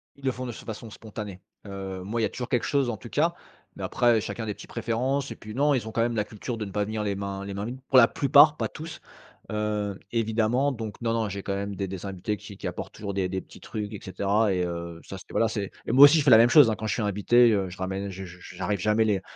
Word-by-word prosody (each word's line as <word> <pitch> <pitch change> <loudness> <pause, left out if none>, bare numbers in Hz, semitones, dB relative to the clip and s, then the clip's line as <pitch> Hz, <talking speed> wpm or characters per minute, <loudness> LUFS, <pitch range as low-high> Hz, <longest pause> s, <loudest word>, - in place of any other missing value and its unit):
Ils 140 - -20
le 130 - +3
font 130 0 -6
de 120 - -4
s - - -10
de - - -17
façon 110 0 -7
spontanée. 105 -3 -8 0.2
Heu, 95 -2 -6
moi 115 +4 -2
il - - +1
y - - +4
a - - -1
toujours 125 +3 -6
quelque 125 -4 +1
chose 140 -4 +1
en 110 - -3
tout 120 - -11
cas, 165 +6 +2 0.4
mais - - -7
après 120 -3 +3
chacun 115 - -5
a - - -4
des 105 - -2
petites - - -13
préférences. 125 +4 -1
Et - - -5
puis 105 0 -10
non, 145 +3 +3
ils 120 -5 -1
ont - - -5
quand 115 - 0
même 120 0 +1
la 105 - +1
culture 110 +3 -6
de 110 - -3
ne 100 - -8
pas 105 0 0
venir 110 0 -3
les 100 -1 -1
mains 100 0 -4
les 100 - -5
mains 100 +1 -4
vides, 125 +3 -6
pour 135 - +5
la 120 -2 +9
plupart, 145 +4 +5
pas - - -1
tous, 160 +1 -8 0.5
heu, 105 -2 -2
évidemment. 115 +4 +1
Donc 110 -5 -6
non, 115 -1 0
non, 115 -2 0
j'ai 100 0 -5
quand 100 - -2
même 100 0 -3
des 100 0 -3
des 95 0 -6
invités 100 +2 -3
qui 100 -1 -11
qui - - -5
apportent - - -6
toujours 100 -1 -5
des 95 -1 -1
des 95 0 -2
petits - - -15
trucs, 105 0 -5
et 105 - -6
cetera, 100 +2 +1
et 90 -1 0
heu, 85 -1 -5
ça 95 - -8
c'était - - -13
voilà, 115 - +3
c'est 105 -3 -3
et - - -2
moi 135 +4 +10
aussi, 145 +3 +6
je - - +1
fais 140 - +4
la 110 - +10
même 115 +2 +6
chose, 140 -2 +8
hein, 110 - 0
quand 110 - -4
je 110 - 0
suis 115 - -2
invité, 110 +4 +4
heu, 100 -3 0
je 90 - -10
ramène 95 +1 -3
je 95 0 -7
je 90 0 -12
je 90 - -12
j'arrive 95 +2 -1
jamais 105 +4 +2
les 100 -3 +1
105 Hz, 305 wpm, -26 LUFS, 100-120 Hz, 0.5 s, moi